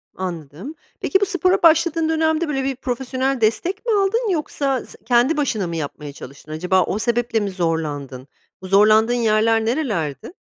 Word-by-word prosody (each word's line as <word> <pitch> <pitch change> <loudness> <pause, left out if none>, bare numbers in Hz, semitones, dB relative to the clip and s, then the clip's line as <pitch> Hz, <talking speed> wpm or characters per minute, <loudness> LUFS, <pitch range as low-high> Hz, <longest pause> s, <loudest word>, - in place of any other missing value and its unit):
Anladım. 180 - -6 0.3
Peki, 385 - +1
bu - - +4
spora 370 0 +1
başladığın 330 0 +4
dönemde, 320 +1 +1
böyle, 270 -3 -2
bir 270 0 -2
profesyonel 260 +1 -2
destek 345 - 0
mi 470 - 0
aldın 415 +3 +1
yoksa 280 -5 -1
se - - -10
kendi 250 +6 +3
başına 220 -10 -1
mı 170 - -5
yapmaya 150 -2 -6
çalıştın? 140 +2 -12
Acaba 180 +4 +1
o 205 - -3
sebeple 235 0 0
mi 205 -2 -2
zorlandın? 150 -7 -3 0.3
Bu 185 - -8
zorlandığın 215 +4 +4
yerler 225 -1 +2
nerelerdi? 215 - -2
235 Hz, 160 wpm, -20 LUFS, -, 0.3 s, bu